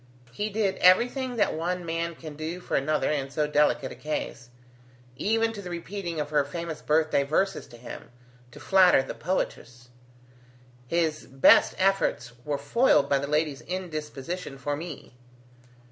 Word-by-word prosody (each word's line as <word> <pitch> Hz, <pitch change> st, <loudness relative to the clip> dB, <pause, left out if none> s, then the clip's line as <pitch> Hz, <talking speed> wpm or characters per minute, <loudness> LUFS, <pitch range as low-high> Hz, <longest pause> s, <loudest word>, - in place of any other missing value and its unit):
He 205 Hz, -, -3 dB
did 205 Hz, -2 st, 0 dB
everything 245 Hz, +7 st, +3 dB
that 215 Hz, -, +2 dB
one 175 Hz, +2 st, -2 dB
man 165 Hz, 0 st, -2 dB
can 155 Hz, -2 st, -9 dB
do 160 Hz, +4 st, -5 dB
for 180 Hz, -, -3 dB
another 150 Hz, +3 st, +1 dB
in 140 Hz, -3 st, -2 dB
so 150 Hz, +2 st, 0 dB
delicate 150 Hz, -2 st, +2 dB
a -, -, -8 dB
case: 150 Hz, -4 st, -5 dB, 0.7 s
even 225 Hz, -, +1 dB
to 205 Hz, -, -7 dB
the 180 Hz, -, -8 dB
repeating 175 Hz, -1 st, -5 dB
of 150 Hz, 0 st, -3 dB
her 150 Hz, -1 st, +3 dB
famous 165 Hz, +2 st, -6 dB
birthday 155 Hz, -1 st, +2 dB
verses 160 Hz, +8 st, 0 dB
to 120 Hz, -, -14 dB
him, 120 Hz, -, -10 dB, 0.4 s
to 125 Hz, -, -13 dB
flatter 185 Hz, -7 st, +5 dB
the -, -, -6 dB
poetess. 125 Hz, -8 st, -4 dB, 1.0 s
His 160 Hz, 0 st, -1 dB
best 135 Hz, +1 st, +5 dB
efforts 195 Hz, -8 st, +1 dB
were 145 Hz, 0 st, -2 dB
foiled 145 Hz, -, +3 dB
by 140 Hz, -, +3 dB
the 140 Hz, -, -3 dB
lady's 150 Hz, -1 st, 0 dB
indisposition 160 Hz, -3 st, -5 dB
for 145 Hz, +2 st, -2 dB
me." 160 Hz, -4 st, -8 dB
160 Hz, 155 wpm, -27 LUFS, 145-185 Hz, 1.0 s, flatter